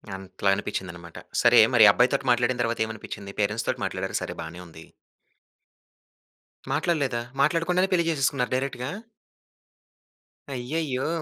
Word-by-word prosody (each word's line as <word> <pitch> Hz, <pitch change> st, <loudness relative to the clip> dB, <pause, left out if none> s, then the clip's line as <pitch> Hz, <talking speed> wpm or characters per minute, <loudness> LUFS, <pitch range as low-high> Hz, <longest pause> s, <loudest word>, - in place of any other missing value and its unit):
అట్లా 95 Hz, +1 st, -3 dB
అనిపించిందనమాట. 90 Hz, -4 st, -6 dB, 0.2 s
సరే! 120 Hz, 0 st, +6 dB, 0.2 s
మరి 110 Hz, -2 st, +8 dB
అబ్బాయితోటి 135 Hz, +3 st, +2 dB
మాట్లాడిన 120 Hz, +1 st, +1 dB
తర్వాత 115 Hz, 0 st, -2 dB
ఏమనిపించింది? 100 Hz, -2 st, -8 dB
పేరెంట్స్‌ 105 Hz, +2 st, -1 dB
తోటి -, -, -2 dB
మాట్లాడారు -, -, -2 dB
సరే -, -, -5 dB
బానే 80 Hz, +2 st, -9 dB
ఉంది. 80 Hz, 0 st, -13 dB, 1.8 s
మాట్లాడలేదా? 140 Hz, -8 st, 0 dB, 0.2 s
మాట్లాడకుండానే 170 Hz, +5 st, +2 dB
పెళ్లి 170 Hz, -2 st, +2 dB
చేసేసుకున్నారు 135 Hz, -4 st, 0 dB
డైరెక్ట్‌గా? 130 Hz, -1 st, -3 dB, 1.6 s
అయ్యయ్యో! 130 Hz, +1 st, -2 dB
120 Hz, 105 wpm, -25 LUFS, 100-140 Hz, 1.8 s, మరి